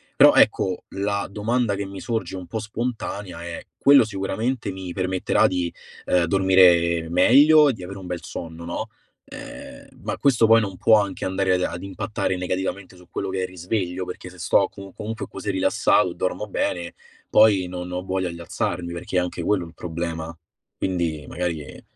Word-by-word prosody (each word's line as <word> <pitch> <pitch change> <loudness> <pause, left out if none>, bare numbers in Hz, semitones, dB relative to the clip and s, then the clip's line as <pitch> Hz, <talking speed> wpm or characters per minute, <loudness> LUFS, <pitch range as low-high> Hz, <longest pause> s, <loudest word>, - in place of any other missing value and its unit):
Però - - +8
ecco 95 -1 +3
la 100 +1 -2
domanda 110 +1 0
che 100 0 -3
mi 95 -1 -8
sorge 110 -6 -3
un 90 - -6
po' 110 - -3
spontanea 105 -5 -4
è: 85 -1 -6
quello 140 -5 +6
sicuramente 110 +3 -2
mi 95 -2 -7
permetterà 95 -1 +2
di, 90 -2 -2 0.3
ehm, 90 -1 +3
dormire 85 -3 +4
meglio 145 - +6
e 135 - +1
di 95 - -10
avere 95 +2 -7
un 90 - -9
bel 90 -1 -5
sonno, 80 0 -7
no, 85 +6 -4 0.4
ehm, - - -10 0.2
ma - - -3
questo 120 -5 +3
poi 115 0 +7
non 95 -3 -4
può 110 +2 +5
anche 100 -2 -5
andare 95 0 +1
ad 90 - +1
ad 85 0 -3
impattare 95 0 -2
negativamente 95 +1 -3
su 90 -1 -17
quello 95 - -3
che 95 - -2
è - - 0
il - - -2
risveglio, 90 0 -3
perché 90 0 -8
se 90 - -15
sto 95 +3 +3
com 100 -1 -11
comunque 110 +1 -5
così 105 - -4
rilassato 95 -1 +2
e - - -10
dormo 105 +3 -2
bene, 85 -3 -2 0.3
poi 100 -4 +5
non 90 0 -6
ho 90 0 -3
voglia 95 -2 -2
di 85 - -9
alzarmi, 85 +1 -3
perché 90 +2 -3
è - - +6
anche 90 -1 -3
quello 95 -3 +1
il 80 - -14
problema, 85 -1 -5 0.4
quindi 85 -5 -1
magari, 85 -3 -3
ehm - - -12
95 Hz, 190 wpm, -23 LUFS, 90-100 Hz, 0.4 s, Però